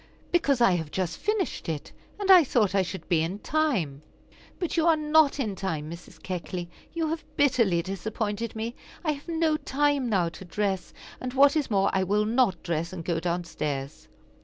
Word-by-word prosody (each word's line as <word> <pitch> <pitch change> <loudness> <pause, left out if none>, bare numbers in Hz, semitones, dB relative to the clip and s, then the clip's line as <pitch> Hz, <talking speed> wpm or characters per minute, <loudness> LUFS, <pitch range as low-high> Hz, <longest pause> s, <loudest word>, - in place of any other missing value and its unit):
"Because 280 -7 +2
I 235 - +6
have 165 -4 -1
just 180 +1 -2
finished 415 - -1
it, 155 -3 -4 0.3
and 395 -1 +3
I 365 -3 +9
thought 215 -8 +2
I 195 - +4
should 190 +1 -5
be 170 -3 +3
in 170 +5 -2
time." 210 - 0 0.6
"But 350 - -2
you 330 0 +3
are 330 - +6
not 305 -1 +3
in 215 -7 -1
time, 160 -6 -3
Mrs. 170 -1 -11
Keckley; 175 -1 -4 0.2
you 330 -2 -1
have 325 0 -3
bitterly 230 -12 +3
disappointed 210 +4 -3
me. 225 +2 -3 0.3
I 310 - +3
have 285 +1 -7
no 325 -2 +1
time 285 -2 +1
now 185 -6 +2
to 165 +3 -11
dress, 190 +1 -2 0.3
and, 255 -1 -5
what 280 +2 +6
is 300 -3 0
more, 200 -2 +2
I 190 - +2
will 205 +3 +1
not 220 -6 +2
dress, 170 0 -2
and 170 -3 -7
go 170 -2 0
down 175 +1 -1
stairs." 145 -4 -4
205 Hz, 190 wpm, -27 LUFS, 175-285 Hz, 0.6 s, I